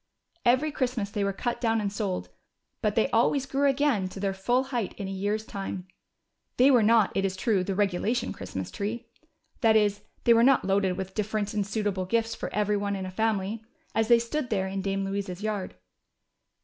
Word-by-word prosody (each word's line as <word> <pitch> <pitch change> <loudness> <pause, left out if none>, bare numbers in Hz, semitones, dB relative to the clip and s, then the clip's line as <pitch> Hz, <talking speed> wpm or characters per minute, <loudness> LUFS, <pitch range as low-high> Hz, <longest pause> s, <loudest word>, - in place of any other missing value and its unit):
Every 260 +6 +3
Christmas 245 -7 -2
they 205 -1 -1
were 200 - +1
cut 235 +5 -3
down 225 -2 +2
and 200 -2 -2
sold, 200 -3 -3 0.5
but - - 0
they - - +3
always 275 -2 +2
grew 275 +1 +2
again 270 -9 +1
to 195 - -9
their 195 0 0
full 240 +7 +1
height 245 -6 -3
in 200 - -4
a - - -5
year's 205 +3 -2
time. 195 -3 -5 0.7
They 260 +3 +6
were 245 -3 +6
not, 220 -1 +4
it 195 - +1
is 190 -1 -1
true, 190 -1 +1
the 195 +1 -2
regulation 205 +4 0
Christmas 95 -2 -6
tree. 225 +4 -4 0.5
That 225 -4 +4
is, 205 -1 +3 0.2
they 235 - +6
were 230 - +5
not 265 +2 +4
loaded 195 -1 +2
with 190 0 -5
different 210 -1 -2
and 210 -1 +1
suitable 200 -3 -1
gifts 225 +3 0
for - - -5
every 210 0 +1
one 200 0 -1
in 190 -1 -4
a 185 - -6
family, 215 +1 -1 0.3
as 225 -1 +1
they 235 0 +7
stood 240 +3 -2
there 195 -3 0
in 195 0 -3
Dame 195 0 -1
Louisa's 195 -1 -4
yard. 210 -3 -3
210 Hz, 200 wpm, -27 LUFS, 195-230 Hz, 0.7 s, they